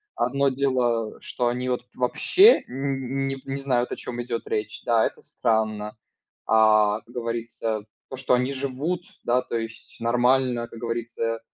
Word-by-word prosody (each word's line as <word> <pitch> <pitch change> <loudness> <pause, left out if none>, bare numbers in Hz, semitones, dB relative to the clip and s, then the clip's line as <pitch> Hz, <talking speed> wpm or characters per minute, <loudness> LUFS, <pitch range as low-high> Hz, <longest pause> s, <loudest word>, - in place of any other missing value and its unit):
одно 140 - +2
дело, 125 -4 0
что 120 - -1
они 125 +1 -1
вот 125 -1 -1
вообще 370 - +5
н 135 0 -2
не 135 0 -3
не 135 0 -3
знают, 125 -3 0
о - - -1
чём 120 -1 -5
идет 120 -1 -4
речь. 105 0 -3
Да, 115 -2 +3
это - - -4
странно. 110 -1 -1 0.5
А, 110 -1 +4
как 120 - -19
говорится, 115 -2 -3 0.2
то, 130 - -6
что 130 - +1
они 125 +2 +2
живут, 140 +6 -2 0.2
да, 125 +1 +2
то 120 - -3
есть 115 0 -8
нормально, 120 0 +2
как 115 - -11
говорится, 115 -1 -2
120 Hz, 155 wpm, -25 LUFS, 115-130 Hz, 0.5 s, вообще